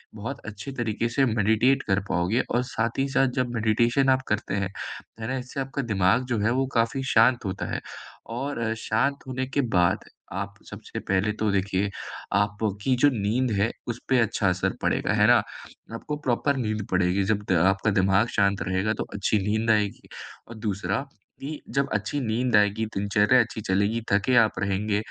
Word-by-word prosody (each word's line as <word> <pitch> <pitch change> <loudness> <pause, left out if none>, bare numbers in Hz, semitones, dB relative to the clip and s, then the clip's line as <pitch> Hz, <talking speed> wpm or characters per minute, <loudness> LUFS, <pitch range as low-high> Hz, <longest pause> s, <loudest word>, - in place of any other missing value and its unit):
बहुत 120 +6 -5
अच्छे 110 +4 -7
तरीके 115 -2 -1
से 135 +4 +1
मेडिटेट 115 +4 +2
कर 95 0 +2
पाओगे 90 +8 +1
और 120 - +1
साथ 115 -2 -2
ही 135 - +2
साथ 135 0 +3
जब 125 - +1
मेडिटेशन 120 +4 +2
आप 130 0 +3
करते 105 -1 -1
हैं, 100 -2 -1 0.5
है 110 - -3
ना? 130 +1 -2
इससे 125 +2 -6
आपका 135 +1 -3
दिमाग 105 +1 +2
जो 120 -3 0
है, 110 +3 +2
वो 130 +2 +1
काफ़ी 120 +4 +1
शांत 115 +1 +4
होता 95 - -3
है। - - -2 0.5
और 135 +4 -4
अ, 110 -1 0
शांत 115 +6 0
होने 130 0 -3
के 140 +2 0 0.2
बाद, 90 -1 +2 0.3
आप 100 +2 -4
सबसे - - -7
पहले 95 +2 0
तो 110 -1 0
देखिए, 100 0 0 0.4
आपकी 105 +4 0
जो 145 - +8
नींद 115 +3 0
है, 115 - +2 0.2
उस 120 0 -4
पे 130 -1 +4
अच्छा 110 -3 +1
असर 90 0 0
पड़ेगा, - - +1
है - - +4
ना? - - +6 0.5
आपको 150 +6 -4
प्रॉपर 135 +3 +1
नींद 110 -4 -2
पड़ेगी, 90 +1 +2
जब 105 +1 0
द - - +4 0.2
आपका 95 +2 0
दिमाग 95 +4 +3
शांत 100 -1 +2
रहेगा, 95 +4 0
तो - - -3
अच्छी 105 +1 +1
नींद 110 +2 +2
आएगी। 105 -2 0 0.4
और 115 - -10
दूसरा, 95 +6 -2 0.4
कि 150 +2 -6
जब 140 0 +1
अच्छी 110 +7 -1
नींद 120 0 0
आएगी, 105 +1 +3
दिनचर्या 105 +4 +3
अच्छी 110 -1 -4
चलेगी, 100 +3 0
थके 105 +6 +3
आप 110 -2 +5
रहेंगे, 100 +2 0
110 Hz, 185 wpm, -25 LUFS, 100-125 Hz, 0.5 s, जो